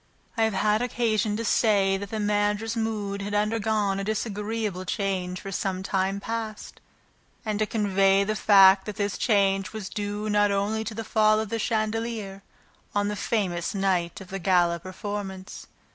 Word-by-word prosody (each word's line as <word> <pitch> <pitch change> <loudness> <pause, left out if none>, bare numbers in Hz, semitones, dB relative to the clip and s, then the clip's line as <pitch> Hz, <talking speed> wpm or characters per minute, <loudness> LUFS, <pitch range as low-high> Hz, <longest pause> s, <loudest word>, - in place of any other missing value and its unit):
I 225 - +3
have 220 -3 -1
had 210 +3 +2
occasion 225 -3 0
to 230 - -3
say 200 -3 +3
that 200 0 -5
the 220 - -3
managers' 210 +2 0
mood 210 -3 -2
had 205 +1 -3
undergone 210 -2 0
a - - -2
disagreeable 210 -2 -2
change 185 -2 -2
for 195 - -7
some 190 0 -2
time 195 0 0
past 225 0 -5 0.6
and 215 -1 -1
to 215 - +1
convey 195 -2 +3
the 215 +2 -1
fact 195 -1 +6
that 210 - -4
this 205 0 -1
change 195 -3 +1
was 210 -3 -5
due 205 0 -4
not 205 -1 +3
only 205 +2 0
to 215 - -5
the 225 - -4
fall 215 0 +3
of 220 -1 -3
the 230 - -2
chandelier 215 -2 -2 0.5
on 205 0 +1
the 210 - -2
famous 185 -5 -1
night 185 -3 0
of 190 -2 -11
the 195 - -4
gala 175 -2 +2
performance. 190 +1 -6
205 Hz, 170 wpm, -26 LUFS, 195-215 Hz, 0.6 s, fact